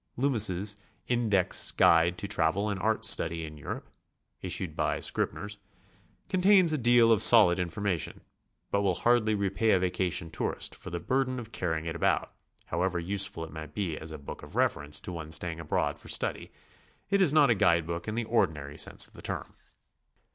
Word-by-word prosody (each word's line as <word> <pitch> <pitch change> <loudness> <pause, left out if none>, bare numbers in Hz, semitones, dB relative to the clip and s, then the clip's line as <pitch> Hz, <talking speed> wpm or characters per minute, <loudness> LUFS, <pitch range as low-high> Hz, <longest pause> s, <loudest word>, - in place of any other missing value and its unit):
Loomis's 105 -6 +1 0.3
'Tndex 110 -7 +1
Guide 85 +2 +4
to 100 - -4
Travel 95 +5 0
and 100 -2 -3
Art - - +1
Study 80 0 +1
in 75 0 -9
Europe," 75 - -7 0.5
issued - - -4
by - - -1
Scribner's, 105 0 -3 0.7
contains 185 -2 +4
a - - +1
deal 120 -1 +5
of 110 - +5
solid 95 -6 +7
infor 90 +3 -4
mation, 90 -9 -2 0.5
but 100 - +1
will 95 -3 +1
hardly 115 -1 +2
repay 100 +2 0
a 95 - +4
vacation 90 -2 -2
tourist - - -3
for - - -9
the 85 - -4
bur 130 +9 0
den 130 0 -5
of 115 -2 -8
carrying 80 -5 -3
it 80 0 -4
about, 85 - 0 0.3
however 90 -1 -1
useful 95 0 0
it 80 - -13
might 80 -2 -9
be 90 -6 -2
as 80 +1 -7
a 80 - -6
book 70 - -9
of - - -12
reference 75 +1 0
to - - -8
one 80 -2 -7
staying 80 +1 0
abroad 80 - -2
for - - -13
study; - - -1 0.6
it 200 0 +3
is 175 -7 +5
not 145 -4 +5
a - - +6
guide 85 -5 +2
book 85 +2 -5
in 110 - -3
the 120 - -1
ordinary 80 -10 -1
sense - - 0
of - - -17
the - - -12
term. - - -5
95 Hz, 190 wpm, -28 LUFS, 80-110 Hz, 0.7 s, solid